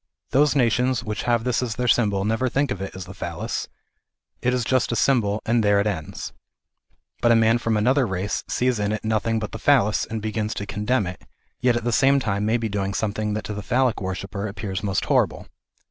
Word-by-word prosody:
Those 145 Hz, +3 st, +3 dB
nations 125 Hz, -1 st, +2 dB
which 105 Hz, -2 st, -3 dB
have 120 Hz, -1 st, +2 dB
this 125 Hz, 0 st, 0 dB
as 120 Hz, -3 st, -2 dB
their 125 Hz, -, -1 dB
symbol, 100 Hz, -5 st, +2 dB
never 115 Hz, +4 st, +1 dB
think 140 Hz, +2 st, 0 dB
of 95 Hz, -, -3 dB
it 95 Hz, -, -6 dB
as 95 Hz, -1 st, -6 dB
the 90 Hz, -, -10 dB
Phallas; 85 Hz, -4 st, -4 dB, 0.7 s
it 125 Hz, -, +2 dB
is 125 Hz, -1 st, 0 dB
just 130 Hz, 0 st, +1 dB
a -, -, 0 dB
symbol, 110 Hz, -3 st, +2 dB
and 115 Hz, 0 st, +2 dB
there 100 Hz, -1 st, +4 dB
it 100 Hz, -, +1 dB
ends. 90 Hz, -8 st, -4 dB, 0.9 s
But 120 Hz, -1 st, +4 dB
a -, -, +6 dB
man 115 Hz, +1 st, +4 dB
from 115 Hz, -2 st, 0 dB
another 130 Hz, +4 st, +3 dB
race 95 Hz, +1 st, -2 dB
sees 125 Hz, -2 st, 0 dB
in 105 Hz, +1 st, 0 dB
it 110 Hz, -, -4 dB
nothing 110 Hz, +1 st, +1 dB
but 105 Hz, -1 st, -4 dB
the 110 Hz, -, -6 dB
Phallas, 105 Hz, -4 st, +3 dB
and 110 Hz, 0 st, -4 dB
begins 110 Hz, 0 st, -2 dB
to 100 Hz, -, -4 dB
condemn 105 Hz, +3 st, 0 dB
it, 90 Hz, 0 st, -7 dB, 0.4 s
yet 125 Hz, -1 st, +3 dB
at 120 Hz, -, -2 dB
the 120 Hz, -, 0 dB
same 135 Hz, +4 st, +4 dB
time 105 Hz, -4 st, -1 dB
may 115 Hz, +2 st, +2 dB
be 115 Hz, -1 st, -2 dB
doing 100 Hz, -1 st, -2 dB
something 105 Hz, 0 st, -1 dB
that 110 Hz, -, -3 dB
to 105 Hz, -, -5 dB
the 105 Hz, -, -5 dB
Phallic 125 Hz, +3 st, +1 dB
worshipper 95 Hz, +2 st, -4 dB
appears 100 Hz, -2 st, -4 dB
most 95 Hz, -2 st, -1 dB
horrible. -, -, +1 dB
110 Hz, 225 wpm, -23 LUFS, 100-120 Hz, 0.9 s, a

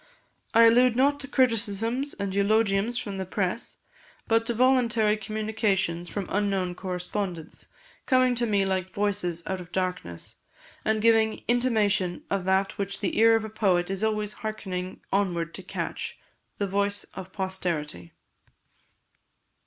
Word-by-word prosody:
I 230 Hz, -, +8 dB
allude 235 Hz, +1 st, +6 dB
not 285 Hz, +3 st, +3 dB
to 275 Hz, -, -7 dB
criticisms 235 Hz, 0 st, +1 dB
and 200 Hz, -2 st, -3 dB
eulogiums 205 Hz, +2 st, +2 dB
from 200 Hz, -5 st, -5 dB
the 190 Hz, -, -2 dB
press, 190 Hz, +3 st, -2 dB, 0.5 s
but 225 Hz, -1 st, +2 dB
to 235 Hz, -, +1 dB
voluntary 235 Hz, -4 st, +3 dB
communications 205 Hz, -5 st, -1 dB
from 200 Hz, -2 st, -3 dB
unknown 195 Hz, -3 st, 0 dB
correspondents, 180 Hz, -2 st, -5 dB, 0.4 s
coming 255 Hz, -2 st, +4 dB
to 240 Hz, 0 st, 0 dB
me 200 Hz, -2 st, +2 dB
like 185 Hz, -1 st, -2 dB
voices 200 Hz, -5 st, -1 dB
out 190 Hz, -1 st, -3 dB
of 175 Hz, 0 st, -12 dB
darkness, 180 Hz, -, -3 dB, 0.5 s
and 220 Hz, 0 st, 0 dB
giving 225 Hz, -1 st, +3 dB
intimation 215 Hz, -7 st, +1 dB
of 195 Hz, -2 st, 0 dB
that 190 Hz, +1 st, +1 dB
which 200 Hz, 0 st, -2 dB
the 195 Hz, -, -2 dB
ear 225 Hz, 0 st, +7 dB
of 225 Hz, -1 st, 0 dB
a -, -, -6 dB
poet 190 Hz, -4 st, +1 dB
is 195 Hz, +2 st, -2 dB
always 215 Hz, -1 st, 0 dB
hearkening 190 Hz, -4 st, -4 dB
onward 175 Hz, -4 st, 0 dB
to -, -, -7 dB
catch -, -, -5 dB, 0.4 s
the 200 Hz, -, 0 dB
voice 200 Hz, +1 st, 0 dB
of 190 Hz, -1 st, -8 dB
posterity." 170 Hz, -, -3 dB
200 Hz, 140 wpm, -27 LUFS, 185-225 Hz, 0.5 s, I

